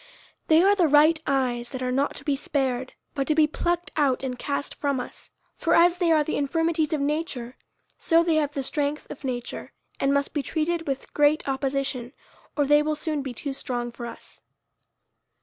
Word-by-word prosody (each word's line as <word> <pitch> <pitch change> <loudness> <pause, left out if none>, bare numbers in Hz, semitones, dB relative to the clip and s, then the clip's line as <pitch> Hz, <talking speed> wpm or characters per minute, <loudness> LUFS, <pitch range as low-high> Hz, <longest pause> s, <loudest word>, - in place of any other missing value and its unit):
They 320 +2 +6
are 400 +1 +6
the 365 -5 +3
right 305 +2 +5
eyes 250 -3 0
that 260 -2 -5
are 250 - -1
not 275 +3 0
to - - -10
be 290 -3 +1
spared, 265 -2 -2 0.2
but 275 -1 -2
to 305 - +2
be 310 -1 +6
plucked 345 +3 -2
out 275 -4 +1
and 250 -2 -4
cast 285 0 -3
from 280 -3 -1
us. - - -8 0.3
For 335 - +2
as 345 +1 +5
they 345 -2 +3
are 310 -2 +4
the 310 - -2
infirmities 320 +2 0
of 310 - 0
nature, 280 -5 -2 0.4
so 335 0 +4
they 330 -2 +2
have 295 -2 0
the 275 - -1
strength 290 +2 -1
of - - -9
nature, 245 -2 -5 0.3
and 275 - +2
must 280 0 0
be 295 - 0
treated 325 +4 -2
with 270 -1 -4
great 295 +1 +3
opposition, 270 -2 -2 0.4
or 290 - +3
they 295 +1 +5
will 305 0 0
soon 305 -1 -2
be 265 -3 -6
too 280 +3 -4
strong 240 -3 -3
for 235 0 -7
us. - - -11
290 Hz, 200 wpm, -25 LUFS, 265-315 Hz, 0.4 s, They